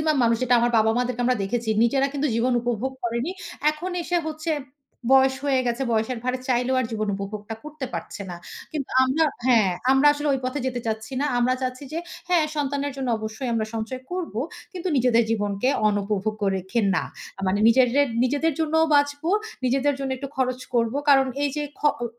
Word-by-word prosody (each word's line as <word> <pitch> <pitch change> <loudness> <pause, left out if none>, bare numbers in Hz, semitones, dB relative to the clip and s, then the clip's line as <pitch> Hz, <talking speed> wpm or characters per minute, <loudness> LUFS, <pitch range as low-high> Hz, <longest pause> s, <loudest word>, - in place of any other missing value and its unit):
Maximum 305 -1 +2
মানুষ 230 0 +3
যেটা 245 0 +3
আমার 240 0 +2
বাবা-মা 220 +3 +3
দেরকে 245 -1 -2
আমরা 250 -3 +2
দেখেছি। 225 +2 -2
নিজেরা 270 +3 +2
কিন্তু 285 +1 0
জীবন 245 +2 +2
উপভোগ 245 +2 -1
করেনি। 235 +9 -1 0.4
এখন 345 +5 -5
এসে 350 +1 -1
হচ্ছে 315 +1 -3 0.6
বয়স 265 0 +6
হয়ে 265 -2 +3
গেছে, 240 +2 -1
বয়সের 225 +2 0
ভারে 255 0 0
চাইলেও 250 +1 +2
আর 255 - -1
জীবন 215 -1 -2
উপভোগটা 210 +2 -6
করতে 305 -3 -6
পারছে - - -5
না। 175 - -6 0.4
কিন্তু 290 -4 -4
আমরা 295 +5 +2 0.2
হ্যাঁ, 225 -7 +5 0.2
আমরা 270 +2 +4
আসলে 295 0 -2
ঐ - - +3
পথে 275 +2 -2
যেতে 245 -1 -2
চাচ্ছি 220 +2 -3
না। 295 - +1
আমরা 250 +1 +3
চাচ্ছি 255 +2 -3
যে, 330 - -2 0.3
হ্যাঁ, 350 -3 +4
সন্তানের 285 0 -1
জন্য 265 -2 -3
অবশ্যই 220 +4 -5
আমরা 220 -1 0
সঞ্চয় 225 +4 -4
করব। 360 -9 -4 0.4
কিন্তু 365 0 -4
নিজেদের 240 -2 +4
জীবনকে 205 +1 0 0.2
অনুপভোগ্য 205 +1 -1
রেখে 190 +5 -1 0.2
না। - - 0 0.3
আ - - -6
মানে 200 +2 +1
নিজেরে 255 +3 +4 0.2
নিজেদের 290 +5 +1
জন্যও 320 +1 +3
বাঁচবো, 290 +3 +2 0.3
নিজেদের 270 +3 +2
জন্য 270 -1 -3
একটু 275 +2 -6
খরচ 255 -1 0
করব। 230 0 +2
কারণ 270 -2 +6 0.2
এইযে, 290 +1 -1 0.2
খ - - -20 0.2
ও - - 0
255 Hz, 185 wpm, -24 LUFS, 230-285 Hz, 0.6 s, বয়স